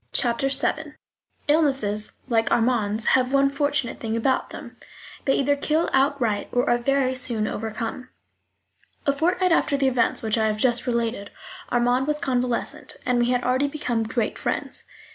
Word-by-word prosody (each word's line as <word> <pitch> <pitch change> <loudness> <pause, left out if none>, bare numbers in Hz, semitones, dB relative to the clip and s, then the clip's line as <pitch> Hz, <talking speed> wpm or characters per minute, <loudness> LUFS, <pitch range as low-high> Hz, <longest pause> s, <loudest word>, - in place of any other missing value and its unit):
Chapter 245 +2 +1
VII 300 +2 -1 0.5
Illnesses 270 -9 +1
like 225 -3 +1
Armand's 225 -2 +1
have 255 0 +3
one 275 0 +3
fortunate 285 -3 -1
thing 225 0 -2
about 260 +3 0
them: - - -10 0.5
they 270 - +3
either 285 +1 +2
kill 310 +3 0
outright 265 -7 +1
or 245 0 +1
are 240 - +3
very 265 +1 +1
soon 245 -4 0
overcome. 225 +4 -4 1.0
A 280 - +3
fortnight 360 +5 +1
after 295 -3 +2
the 275 -1 +2
events 250 -3 +1
which 220 +1 0
I 220 - +2
have 215 0 -1
just 240 +2 +2
related 230 -4 -1 0.4
Armand 245 +2 +2
was 300 0 +1
convalescent, 250 -5 -2
and 250 -1 +2
we 240 0 +2
had 250 0 +1
already 260 +3 +1
become 250 -6 -2
great 225 0 -2
friends. - - -2
250 Hz, 160 wpm, -24 LUFS, 230-280 Hz, 1.0 s, have